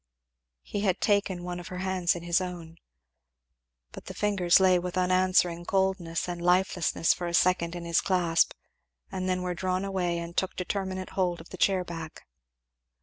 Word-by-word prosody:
He 205 - -4
had 190 -4 +1
taken 200 -4 +1
one 180 0 -5
of 175 - -9
her 180 - -7
hands 185 -2 0
in 170 - -7
his 175 +1 +1
own. 170 -3 -7 1.1
But - - -11
the - - -8
fingers 195 -4 +3
lay 185 -1 +4
with 180 +1 -5
unanswering 185 -1 +2
coldness 190 -3 0
and 175 -1 -5
lifelessness 180 -2 +2
for 175 - -5
a 170 - -1
second 175 -1 +2
in 175 -1 -6
his 170 0 +2
clasp 175 -3 +2 0.6
and 185 0 -3
then 180 0 0
were 180 0 -2
drawn 185 +1 -2
away 180 -3 -1
and 170 0 -6
took 190 - -1
determinate 185 0 -3
hold 180 -2 0
of 165 - -13
the - - -8
chair 190 0 +2
back. 165 -2 -8
180 Hz, 175 wpm, -28 LUFS, 175-185 Hz, 1.1 s, lay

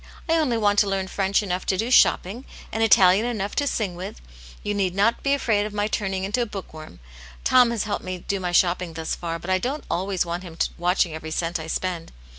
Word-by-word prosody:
I 325 - +2
only 270 -8 +1
want 205 -2 +3
to 205 - +3
learn 195 -1 -1
French 195 +1 +1
enough 185 -2 -2
to 190 - +1
do 230 +5 -1
shopping, 230 -1 +4 0.3
and 225 - -2
Italian 195 0 +5
enough 205 -4 -3
to 285 - +1
sing 210 -8 -1
with; 175 - -7 0.4
you 205 - -1
need 190 -3 0
not 205 +4 +2
be 275 0 +2
afraid 210 -6 +1
of 210 - -10
my 205 0 +1
turning 195 -3 -2
into 210 +6 0
a 235 - -1
book 195 -5 -8
worm. 155 - -11 0.4
Tom 250 -2 +5
has 235 -3 -1
helped 210 -1 -3
me 185 0 -4
do 195 +2 -3
my 180 -1 -2
shopping 175 -1 +2
thus 160 0 -3
far, 165 -1 -4
but 175 +3 -5
I 185 - +3
don't 270 +8 -3
always 185 +1 0
want 170 +1 -3
him 170 -3 -10 0.2
watching 175 -1 +1
every 160 0 -6
cent 165 +2 -2
I 160 - -7
spend. 170 0 -3
195 Hz, 235 wpm, -24 LUFS, 175-215 Hz, 0.4 s, Italian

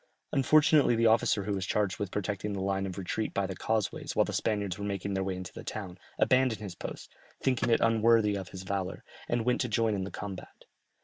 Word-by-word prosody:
Unfortunately 145 -1 +5
the 115 0 +2
officer 110 -2 +3
who 100 +1 -2
was 95 -1 -2
charged 105 -3 0
with 100 - -2
protecting 105 +1 -3
the 100 - -3
line 95 0 -1
of 95 - -6
retreat 100 +3 -3
by 100 - +1
the 95 0 -5
causeways 110 0 -2
while - - +4
the - - -5
Spaniards 100 -3 -1
were - - -4
making 100 -1 -2
their 95 0 0
way 95 -1 -2
into 90 0 -7
the - - -8
town, 95 -4 -6 0.2
abandoned 130 -4 +3
his 100 -4 -6
post, - - -8 0.3
thinking 130 -2 +1
it 115 - +3
unworthy 115 -2 +4
of 95 -2 -5
his 95 0 -8
valour, 95 0 -3 0.3
and 120 -1 0
went 125 0 +2
to 125 - -1
join 110 0 +2
in 95 -2 -1
the 95 - -4
combat. 100 -3 -8
100 Hz, 225 wpm, -30 LUFS, 95-115 Hz, 0.3 s, Unfortunately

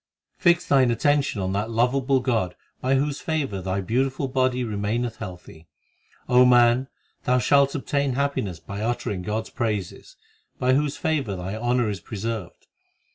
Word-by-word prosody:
3 175 -3 +6
Fix 175 - -10
thine 130 -3 +4
attention 140 -1 +1
on 95 0 -1
that 105 +3 -1
lovable 130 +3 +2
God 110 -9 0 0.2
By 130 +1 +1
whose 145 +1 -1
favour 140 -12 -2
thy 95 +2 -2
beautiful 130 +7 0
body 130 -1 +1
remaineth 110 +2 -2
healthy. 90 -5 -10 0.6
O 125 0 +6
man, 120 +1 +5 0.4
thou 125 0 +3
shalt 140 +3 +3
obtain 140 -1 -1
happiness 125 - -1
by 100 +4 -7
uttering 110 -4 -2
God 105 +4 -2
s - - -13
praises, 110 - -3 0.4
By 130 0 +2
whose 145 +1 +1
favour 150 - -1
thy 95 +3 -5
honour 120 +1 +1
is 100 -2 -3
preserved. 110 -1 -5
120 Hz, 155 wpm, -24 LUFS, 105-135 Hz, 0.6 s, 3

